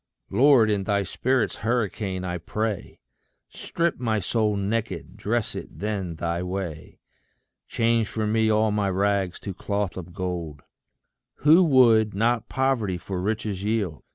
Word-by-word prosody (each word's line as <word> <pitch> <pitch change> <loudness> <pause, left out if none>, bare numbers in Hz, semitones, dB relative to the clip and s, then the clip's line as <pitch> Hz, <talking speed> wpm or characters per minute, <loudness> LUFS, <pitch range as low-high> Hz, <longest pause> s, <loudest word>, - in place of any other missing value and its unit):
Lord, 125 -5 +5
in 100 -2 0
thy 100 -1 +1
spirit's 125 +7 0
hurricane, 105 -5 -1
I 90 -1 -3
pray, 105 +3 -4 0.5
Strip 170 -4 -2
my 110 -3 0
soul 105 +2 0
naked 100 -4 -3
dress 115 +1 -1
it - - -8
then 100 -5 -3
thy 85 +1 -2
way. 90 -4 -5 0.7
Change 115 -1 +1
for 110 +1 -3
me 110 +1 +2
all 110 0 +3
my 105 -1 0
rags 95 -1 0
to 100 - -5
cloth 100 0 -3
of 90 -1 -7
gold. 85 -6 -5 0.8
Who 160 +5 +8
would 115 - +5
not 115 +2 +1
poverty 130 -9 0
for 90 +2 -5
riches 105 -1 -2
yield? 100 - -1
105 Hz, 140 wpm, -25 LUFS, 95-115 Hz, 0.8 s, Who